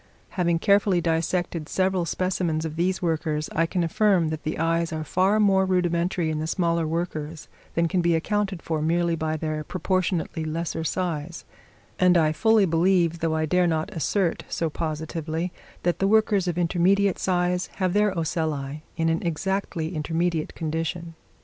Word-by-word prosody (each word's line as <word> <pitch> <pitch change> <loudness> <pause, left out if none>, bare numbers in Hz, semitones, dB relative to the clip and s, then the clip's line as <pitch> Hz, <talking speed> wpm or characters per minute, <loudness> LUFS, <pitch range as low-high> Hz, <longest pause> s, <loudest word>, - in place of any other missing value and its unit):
Having 170 -2 +1
carefully 200 0 +3
dissected 165 -1 -1
several 185 -2 +1
specimens 170 -2 -1
of 155 -1 -5
these 180 +3 0
workers, 155 -2 -1
I 165 +1 +2
can 175 +1 -1
affirm 175 -1 +2
that 155 -1 -4
the 155 - -3
eyes 165 +1 0
are 160 -1 -3
far 190 +6 +2
more 195 -2 +4
rudimentary 175 -2 0
in 155 - -2
the 155 - -2
smaller 170 -1 0
workers 160 -1 -4 0.3
than 170 0 +2
can 180 +2 +1
be 170 -1 +2
accounted 195 +1 -1
for 160 -2 -2
merely 170 +2 +1
by 155 0 -2
their 155 -1 -3
proportionately 185 -1 -1
lesser 160 +1 -3
size; 165 -1 -3 0.5
and 180 -1 +5
I 155 -2 +3
fully 220 +5 +4
believe, 170 0 +2
though 160 -1 0
I 155 0 +1
dare 180 +3 +2
not 160 +5 -1
assert 175 +1 0
so 165 -2 -1
positively, 160 +2 -3 0.3
that 175 0 0
the 195 - +2
workers 210 -3 +3
of 175 -1 -1
intermediate 185 +3 +2
size 180 -1 0
have 185 -2 0
their 210 0 +3
ocelli 155 -3 -2 0.2
in 165 - +1
an 165 0 +1
exactly 175 0 -2
intermediate 165 +1 -1
condition. 165 +1 -3
170 Hz, 160 wpm, -25 LUFS, 160-185 Hz, 0.5 s, and